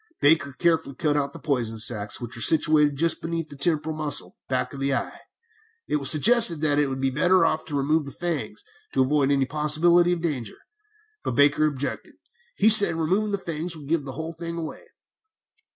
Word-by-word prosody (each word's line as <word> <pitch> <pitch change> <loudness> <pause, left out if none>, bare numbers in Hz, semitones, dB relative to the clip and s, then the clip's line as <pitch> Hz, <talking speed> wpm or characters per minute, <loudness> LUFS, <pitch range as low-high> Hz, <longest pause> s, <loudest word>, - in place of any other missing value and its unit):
Baker 145 -1 +2
carefully 160 -3 0
cut 150 +2 -1
out 140 -1 -1
the - - -11
poison 120 -7 -2
sacs, 105 -2 0
which 120 -1 -7
are 115 - -7
situated 150 0 +3
just 165 +2 +1
beneath 165 -1 -4
the 145 - -11
temporal 155 +1 -1
muscle, 150 -2 -1
back 130 0 -2
of 140 - -8
the 135 0 -1
eye. - - -5 0.7
It - - 0
was 140 -2 +1
suggested 200 +1 +4
that 150 -2 +2
it 145 - +2
would 135 0 -5
be 135 0 0
better 180 +7 +3
to 155 -1 -2
remove 150 +2 0
the - - -7
fangs, 170 - -5 0.3
to 130 - +3
avoid 140 +1 +1
any 140 -1 +2
possibility 155 +5 +2
of 175 -1 -2
danger; 130 -10 -4 0.7
but 120 - -3
Baker 145 +2 +3
objected, 145 -2 -5
as - - -41 0.4
he 220 - +4
said 205 -5 +6
removing 185 +7 0
the 200 - 0
fangs 165 -2 -6
would 145 -3 -12
give 165 -2 0
the 135 - -7
whole 160 +4 -6
thing 170 +1 -7
away. 165 - -7
150 Hz, 200 wpm, -24 LUFS, 140-165 Hz, 0.7 s, said